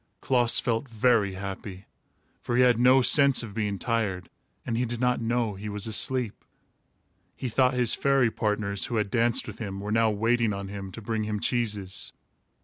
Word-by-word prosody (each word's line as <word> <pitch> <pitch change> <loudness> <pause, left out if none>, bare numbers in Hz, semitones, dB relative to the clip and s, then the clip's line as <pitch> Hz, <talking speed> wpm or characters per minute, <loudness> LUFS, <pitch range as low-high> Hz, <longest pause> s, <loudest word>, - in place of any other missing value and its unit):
Klaas 120 -2 +3
felt 120 +2 -2
very 110 -4 +1
happy, 95 0 -7 0.6
for 120 - -3
he 125 - +4
had 120 -2 +3
no 130 +1 +5
sense 140 +1 +6
of 110 -3 -8
being 105 -2 -2
tired, 100 -6 -2 0.3
and 115 - -2
he 120 - 0
did 120 -1 -4
not 125 -1 0
know 115 -1 -1
he 100 +2 -7
was 105 -1 -3
asleep. 120 +1 -2 0.9
He 130 - -5
thought 130 +2 +2
his 125 -2 +3
fairy 135 -4 +2
partners, 105 -2 -1
who 120 - -4
had 105 -3 -1
danced 120 0 +2
with - - -9
him, 100 -4 -5
were 105 +1 -5
now 115 0 +3
waiting 115 +1 0
on 100 0 -6
him 100 -1 -7
to 115 - -9
bring 110 -1 -2
him 105 -1 -3
cheeses. 105 -6 -2
115 Hz, 185 wpm, -26 LUFS, 100-120 Hz, 0.9 s, sense